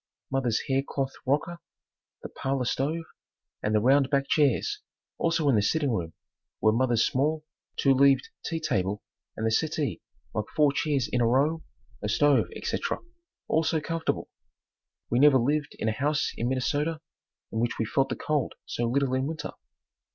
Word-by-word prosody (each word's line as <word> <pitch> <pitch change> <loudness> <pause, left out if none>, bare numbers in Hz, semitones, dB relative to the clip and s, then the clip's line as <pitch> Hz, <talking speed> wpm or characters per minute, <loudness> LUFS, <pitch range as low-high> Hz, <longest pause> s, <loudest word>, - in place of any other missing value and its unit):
Mother's 130 -4 +1
hair 135 -1 +1
cloth 135 -1 -3
rocker, 160 +5 0 0.6
the - - -6
parlor 135 -1 -2
stove 150 +7 -1 0.6
and 105 0 0
the - - +5
round 135 +4 +4
back 140 -1 +1
chairs, 160 - +2 0.4
also 165 -2 +1
in 135 - +4
the 105 - +4
sitting 145 +6 +1
room 85 -7 -2 0.5
were 110 - +4
mother's 120 0 +2
small 155 +4 0 0.3
two 135 - +4
leaved 135 -1 +4
tea 165 -1 -2
table 100 -9 -1 0.3
and 110 - -2
the 110 - +2
settee 155 +3 0 0.3
like 110 - -1
four 150 -2 +5
chairs 140 -5 0
in 125 - 0
a 115 - +4
row, 145 +7 +2 0.4
a 105 - -2
stove, 145 +5 +3
etc., - - -2 0.5
all 160 - +2
so 160 0 +1
comfortable. 165 +2 -2 0.8
We 120 - +3
never 145 -1 +7
lived 145 +4 0
in - - -2
a - - +3
house 145 +6 0
in 120 - -1
Minnesota 145 +5 0 0.5
in 110 - -2
which 120 0 0
we 110 - 0
felt 135 +5 +1
the - - -2
cold 150 -3 -1
so 120 - -2
little 130 +2 +1
in 130 +1 0
winter. 155 0 -5
135 Hz, 170 wpm, -27 LUFS, 120-150 Hz, 0.8 s, never